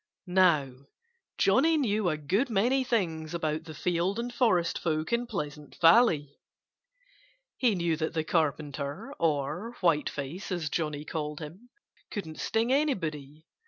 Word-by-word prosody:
Now, 155 -8 +2 0.5
Johnnie 280 +11 +4
knew 215 -8 +1
a 155 - -1
good 190 - 0
many 240 +6 +2
things 170 - -1
about 155 -1 -2
the 160 -2 -9
field 180 +5 0
and 240 +1 -3
forest 185 -9 +2
folk 155 +4 -1
in 240 +1 0
Pleasant 150 -8 -6
Valley. 165 - +4 1.2
He 235 -5 +2
knew 170 -2 0
that 160 +1 -3
the 160 - +1
Carpenter 150 -3 -2
(or 165 - -1
Whiteface, 165 0 -1
as 170 -5 -2
Johnnie 150 -2 -2
called 150 -2 -4
him) 175 +11 -10 0.4
couldn't 160 -7 -6
sting 230 +3 +1
anybody. 160 - -1
170 Hz, 130 wpm, -29 LUFS, 150-215 Hz, 1.2 s, Johnnie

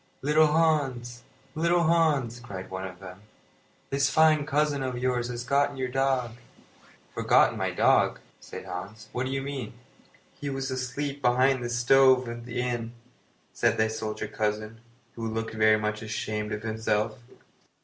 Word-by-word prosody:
"Little 155 +2 +4
Hans! 140 -7 +1 0.3
Little 170 +2 +2
Hans!" 155 -8 +2
cried 95 -6 -8
one 95 0 -4
of 90 -1 -11
them, 95 0 -11 0.7
"this 140 0 +2
fine 155 -2 +4
cousin 150 -1 +1
of 130 -2 -3
yours 125 -1 0
has 120 -1 -5
forgotten 140 +1 +1
your 130 -1 -2
dog." 130 -3 0 0.8
"Forgotten - - +3
my - - -1
dog!" - - +3 0.2
said - - -9
Hans. 95 +4 -8
"What 125 +1 -2
do - - -4
you 135 0 -2
mean?" 135 -5 -5 0.6
"He 145 - -6
was 135 -1 -3
asleep 135 +2 -3
behind 130 +1 +3
the 120 - -3
stove 130 +1 +4
at 120 0 -7
the 125 0 -2
inn," 120 -2 -3 0.6
said - - +1
the 110 0 +2
soldier 110 -1 -4
cousin, 110 +1 -3 0.3
who 115 -1 -4
looked 115 0 -3
very 110 0 +4
much 105 0 -2
ashamed 110 -1 -3
of 105 0 -4
himself. 110 0 -1
125 Hz, 155 wpm, -27 LUFS, 110-135 Hz, 0.8 s, Little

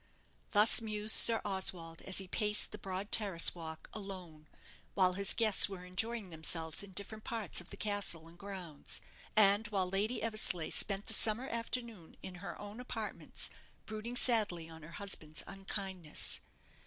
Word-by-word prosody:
Thus 215 +3 +8
mused 215 -1 +1
Sir 230 -1 +6
Oswald 180 -4 -2
as 190 - -1
he 190 - +1
paced 210 +2 +3
the 210 - -8
broad 195 +1 -5
terrace 195 -6 +3
walk 160 -2 -9
alone, 185 -7 -9 0.5
while 185 -2 +3
his 195 +1 +3
guests 215 -3 +5
were 185 -2 -8
enjoying 205 +2 -3
themselves 160 0 -3
in 200 -1 -9
different 215 +3 -4
parts 220 -7 0
of 175 - -13
the 200 - -9
castle 200 -6 -2
and 165 - -16
grounds; 180 -5 -6 0.4
and 210 0 +4
while 195 -3 0
Lady 205 +6 -1
Eversleigh 215 -7 0
spent 200 0 +4
the - - +1
summer 225 +4 +1
afternoon 230 -6 -5
in 190 - -7
her 175 -3 -7
own 205 +3 -9
apartments, 250 - -4 0.3
brooding 220 +3 -6
sadly 210 -10 +1
on 160 0 -12
her 160 +2 -12
husband's 155 -6 -1
unkindness. 190 -4 -1
195 Hz, 155 wpm, -33 LUFS, 175-215 Hz, 0.5 s, Thus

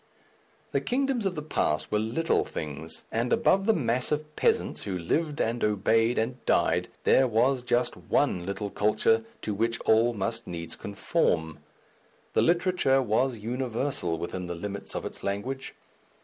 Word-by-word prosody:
The - - +1
kingdoms 260 -4 0
of 185 - -3
the 150 - -4
past 75 - -1
were 105 - +2
little 120 +10 +1
things, 80 +1 -6
and 115 +2 -1
above 195 +2 +3
the 225 - +6
mass 125 -2 0
of 150 0 -2
peasants - - +1
who 95 -2 -3
lived 150 - -1
and 115 +1 0
obeyed 110 +3 +2
and 125 +3 -2
died, - - +2 0.2
there 130 - +5
was 125 +3 +2
just 120 0 +1
one 90 - 0
little 100 +2 -4
culture 110 +2 +2 0.2
to 105 - -2
which 115 +3 0
all 115 +2 +3
must 115 +3 -2
needs 85 -1 -5
conform. 80 -5 -1 0.7
Literature 175 -6 +3
was 120 +2 +1
universal 120 - -2
within 90 +2 -4
the 85 - -4
limits 100 +3 -5
of - - -3
its - - -7
language. 125 +8 -3
115 Hz, 150 wpm, -27 LUFS, 100-135 Hz, 0.7 s, the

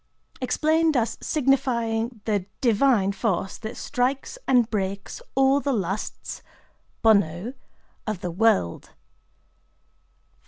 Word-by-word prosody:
Explained 315 +3 +2
as 230 -1 0
signifying 240 -5 0
the 205 -4 0
divine 230 -4 +3
force 195 -2 -2
that 220 0 -6
"strikes 265 - -1
and 245 -3 +4
breaks 195 -2 -3
all 270 +1 +4
the 280 -1 -1
lusts 195 -2 -3 0.6
(bonnō) 200 +1 +3 0.5
of 215 -4 -3
the 175 - -3
world." 195 - +1
225 Hz, 95 wpm, -25 LUFS, 200-265 Hz, 0.6 s, and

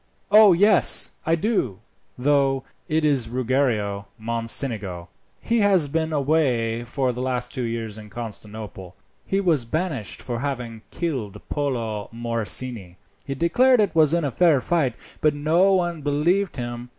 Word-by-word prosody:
O 210 -1 +8
yes, 200 +2 +4 0.2
I 165 - +4
do, 165 - -1 0.4
though; 135 0 +2 0.3
it 155 0 +1
is 135 -6 +1
Ruggiero 115 -6 -1
Mocenigo; 110 -5 -2 0.3
he 235 0 0
has 195 -7 +4
been 160 +2 -1
away 130 -6 +1
for 125 +1 -1
the 125 - -5
last 125 -1 -2
two 130 - -3
years 115 -2 -4
at 105 -1 -12
Constantinople; 105 -5 -8 0.3
he 195 - +1
was 165 -9 +2
banished 145 - -2
for 120 -2 -4
having 120 -5 -4
killed 135 - -4
Polo 115 -8 -2
Morosini 115 -4 -3 0.3
he 135 - -3
declared 245 - +3
it 205 -2 +2
was 155 -3 +4
in 170 -3 0
fair 165 -1 +4
fight, 135 -4 0 0.3
but 155 -1 +2
no 165 +7 +3
one 175 -3 -1
believed 165 +7 +1
him. 120 -1 -6
130 Hz, 140 wpm, -23 LUFS, 115-160 Hz, 0.4 s, O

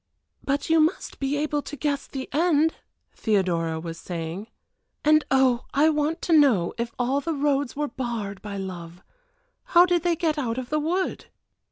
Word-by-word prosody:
"But 280 +1 -1
you 325 0 +4
must 315 +3 0
be 275 +1 -1
able 295 0 -1
to 290 - -8
guess 285 0 -2
the 265 -1 -6
end," 320 0 +3 0.4
Theodora 175 -6 0
was 165 0 -7
saying; 170 +4 -5 0.6
"and 305 0 +5
oh, 260 -2 +3
I 300 +3 +5
want 310 +2 -1
to 340 - +1
know, 260 - +4
if 235 0 -2
all 260 +3 0
the 330 +1 -2
roads 285 -2 0
were 295 +1 -1
barred 230 -8 -4
by 205 -1 -6
love 180 -2 -7 0.7
how 350 - +9
did 355 -1 +1
they 345 0 +1
get 315 -2 0
out 235 -4 -2
of 255 0 -5
the 305 - +2
wood?" 355 +5 -2
275 Hz, 175 wpm, -25 LUFS, 210-305 Hz, 0.7 s, how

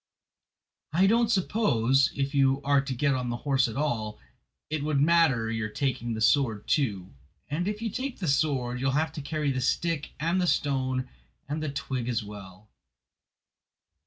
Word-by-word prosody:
I 185 +4 +4
don't 230 +3 +3
suppose, 140 - +2
if 140 0 -2
you 135 -1 +3
are 140 -1 +3
to 135 -1 -4
get 140 +3 +2
on 125 -1 -2
the 120 - -2
horse 135 -2 +3
at 115 - -6
all, 110 -8 -2 0.5
it 155 -1 -2
would 150 -2 +1
matter 145 -8 +3
your 110 -1 -2
taking 120 -1 -2
the 110 - -5
sword 110 -4 +2
too. 100 - 0 0.4
And 165 +6 -1
if 210 +2 -3
you 225 - -2
take 260 +3 -4
the 180 - -4
sword 135 -4 +1
you 135 - 0
will 135 - +1
have 155 +1 +1
to 155 - -5
carry 150 0 -1
the 130 -1 -2
stick 165 +3 -1
and 170 +4 +1
the 180 - +1
stone 130 -4 0 0.4
and 150 +2 -3
the 155 - -2
twig 130 -3 -3
as 115 -2 -1
well." 100 -1 -11
140 Hz, 180 wpm, -27 LUFS, 120-155 Hz, 0.5 s, I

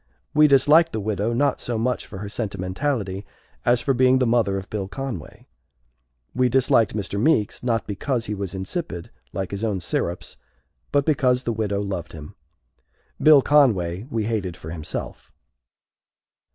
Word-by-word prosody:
We 150 0 +6
disliked 150 +4 +5
the 110 - -1
widow 105 +1 -1
not 140 +4 +1
so 120 -2 -2
much 125 +2 -1
for 95 - -9
her 100 +2 -6
sentimentality 100 +1 -3 0.4
as 120 0 +3
for 135 - +1
being 130 +1 +4
the 130 - +2
mother 115 -5 +2
of 95 0 -6
Bill 100 -3 -3
Conway; 120 - -7 0.9
we 125 0 +2
disliked 120 -4 +3
Mr. 100 -1 -3
Meeks, 115 -8 +2
not 115 -2 0
because 115 +4 -2
he 105 - -3
was 100 -2 -4
insipid, 95 - -4 0.2
like 95 -1 -4
his 100 +2 -4
own 105 -4 0
syrups, 85 - -3 0.5
but 140 -1 +2
because 130 -5 +2
the 115 - -1
widow 105 -2 -1
loved 95 -4 -4
him. 75 -2 -10 0.9
Bill 150 -3 +7
Conway 105 -9 +3
we 115 -6 -1
hated 100 -6 -2
for 80 - -9
himself. 80 -3 -6
110 Hz, 155 wpm, -23 LUFS, 95-130 Hz, 0.9 s, Bill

